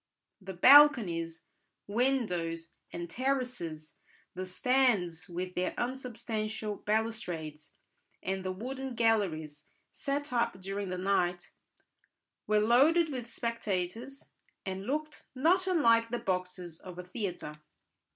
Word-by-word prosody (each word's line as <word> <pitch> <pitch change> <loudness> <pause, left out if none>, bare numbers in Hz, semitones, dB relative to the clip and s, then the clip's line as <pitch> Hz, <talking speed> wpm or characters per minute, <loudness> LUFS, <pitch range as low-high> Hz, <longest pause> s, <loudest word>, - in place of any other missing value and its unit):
The 190 -1 -7
balconies, 180 - +6 0.4
windows, 195 -9 0 0.2
and 170 0 -5
terraces, 245 - -2 0.4
the 185 +1 -5
stands 190 -6 +1
with 180 +1 -4
their 180 0 -1
unsubstantial 220 -4 -3
balustrades, 180 -9 -3 0.5
and 190 0 -2
the 185 - -2
wooden 260 +6 -5
galleries 160 -10 0 0.2
set 285 0 -3
up 235 -5 0
during 195 +1 -4
the 180 - -3
night, 180 -2 0 1.0
were 215 - +3
loaded 295 +9 +4
with 245 -3 -5
spectators, 230 +3 -3 0.3
and 190 +1 -4
looked 305 +3 -3
not 355 +8 +3
unlike 230 -10 +4
the 240 - -1
boxes 180 -4 -3
of 180 -1 -10
a 180 - -5
theatre. 180 -5 -5
210 Hz, 110 wpm, -31 LUFS, 180-250 Hz, 1.0 s, balconies